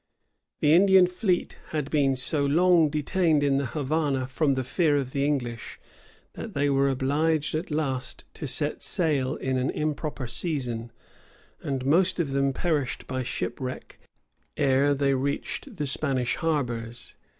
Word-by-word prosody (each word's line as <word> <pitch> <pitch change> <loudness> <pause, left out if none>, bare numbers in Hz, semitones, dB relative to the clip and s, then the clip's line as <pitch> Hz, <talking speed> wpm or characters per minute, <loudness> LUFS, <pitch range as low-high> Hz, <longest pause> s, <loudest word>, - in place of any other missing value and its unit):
The 150 - +5
Indian 190 +1 +6
fleet 180 0 -1
had 150 -3 -3
been 140 -3 +2
so 140 +3 0
long 165 +2 +4
detained 155 +1 +1
in 140 -1 +2
the 140 - -2
Havana 145 -1 -1
from 140 +2 0
the 130 - -1
fear 150 +3 +1
of 130 -2 -2
the 140 0 -1
English, 120 -6 -2 0.5
that - - -8
they 145 0 +2
were 140 0 +3
obliged 145 +4 0
at 155 +3 -2
last 140 -5 -2
to - - -6
set - - -2
sail 145 -5 0
in 130 0 -2
an 130 - 0
improper 150 -2 -3
season, 120 -3 -2 0.7
and 135 -2 -3
most 180 +6 +3
of 155 -5 0
them 140 0 +1
perished 145 -3 -1
by 130 0 -3
shipwreck 125 +1 -5 0.6
ere 140 +2 +3
they 140 0 +2
reached 140 - -3
the 150 -5 -2
Spanish 130 -3 0
harbors. 120 -7 -3
140 Hz, 150 wpm, -26 LUFS, 130-155 Hz, 0.7 s, Indian